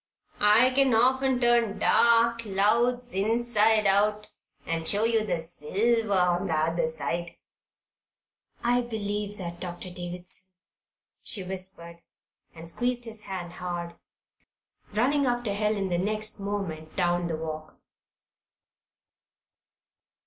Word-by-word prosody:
I 215 Hz, +5 st, +5 dB
can 265 Hz, -2 st, +3 dB
often 260 Hz, +2 st, +2 dB
turn 240 Hz, -3 st, +3 dB
dark 235 Hz, 0 st, +4 dB
clouds 230 Hz, +4 st, +1 dB
inside 220 Hz, +1 st, +2 dB
out 210 Hz, +2 st, +2 dB, 0.3 s
and 165 Hz, -1 st, -2 dB
show 210 Hz, +1 st, +1 dB
you 225 Hz, -1 st, +2 dB
the 195 Hz, -5 st, -2 dB
silver 205 Hz, +8 st, -1 dB
on 180 Hz, +1 st, +2 dB
the 165 Hz, -, -1 dB
other 160 Hz, +1 st, 0 dB
side." 170 Hz, +1 st, -4 dB, 1.3 s
"I 245 Hz, +1 st, +2 dB
believe 210 Hz, -3 st, -4 dB
that, 175 Hz, -2 st, -7 dB
Doctor 180 Hz, 0 st, -6 dB
Davison," 180 Hz, +1 st, -4 dB, 0.7 s
she 195 Hz, -, -2 dB
whispered, 180 Hz, -2 st, -4 dB, 0.5 s
and 165 Hz, +1 st, -10 dB
squeezed 245 Hz, +6 st, 0 dB
his 220 Hz, -2 st, -5 dB
hand 180 Hz, -3 st, -6 dB
hard, 175 Hz, -1 st, -5 dB, 1.0 s
running 265 Hz, +6 st, +1 dB
after 240 Hz, -4 st, -1 dB
Helen 205 Hz, -1 st, -1 dB
the 175 Hz, -1 st, 0 dB
next 215 Hz, +3 st, -1 dB
moment 195 Hz, -6 st, -5 dB
down 175 Hz, -1 st, 0 dB
the 165 Hz, -2 st, -3 dB
walk. 155 Hz, -1 st, -7 dB
205 Hz, 115 wpm, -27 LUFS, 175-230 Hz, 1.3 s, I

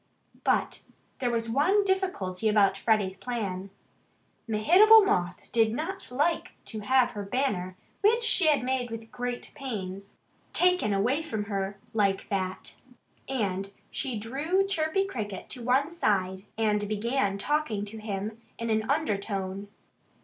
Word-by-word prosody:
But -, -, +1 dB, 0.4 s
there 250 Hz, -, 0 dB
was 230 Hz, -1 st, -1 dB
one 305 Hz, -, +3 dB
difficulty 295 Hz, -, 0 dB
about 200 Hz, -2 st, +4 dB
Freddie's 200 Hz, -2 st, +1 dB
plan. 200 Hz, -5 st, -4 dB, 0.8 s
Mehitable 390 Hz, -, +7 dB
Moth 180 Hz, -, -1 dB
did 225 Hz, -2 st, +3 dB
not 325 Hz, -, -4 dB
like 295 Hz, +7 st, 0 dB
to 220 Hz, -, -6 dB
have 255 Hz, +3 st, +3 dB
her 210 Hz, -, -5 dB
banner, 200 Hz, -5 st, -1 dB, 0.3 s
which 455 Hz, +3 st, +4 dB
she 390 Hz, -6 st, +4 dB
had 290 Hz, -4 st, +4 dB
made 255 Hz, -1 st, -1 dB
with 225 Hz, 0 st, -8 dB
great 245 Hz, 0 st, -4 dB
pains, 200 Hz, -8 st, -6 dB, 0.4 s
taken 360 Hz, -10 st, +3 dB
away 235 Hz, +10 st, +1 dB
from 250 Hz, -10 st, -3 dB
her 200 Hz, -1 st, -3 dB, 0.2 s
like 200 Hz, -3 st, +1 dB
that. 190 Hz, -2 st, -3 dB, 0.5 s
And 200 Hz, -6 st, -2 dB, 0.2 s
she 260 Hz, -5 st, -3 dB
drew 290 Hz, -, 0 dB
Chirpy 390 Hz, 0 st, 0 dB
Cricket 210 Hz, -, -5 dB
to 250 Hz, -, -4 dB
one 265 Hz, +5 st, +2 dB
side 190 Hz, -, 0 dB
and 210 Hz, -2 st, +1 dB
began 215 Hz, -1 st, 0 dB
talking 230 Hz, -4 st, -1 dB
to 220 Hz, +2 st, -8 dB
him 215 Hz, +1 st, -5 dB, 0.2 s
in 230 Hz, -1 st, -2 dB
an 220 Hz, 0 st, 0 dB
undertone. 200 Hz, -8 st, -1 dB
225 Hz, 135 wpm, -28 LUFS, 200-280 Hz, 0.8 s, Mehitable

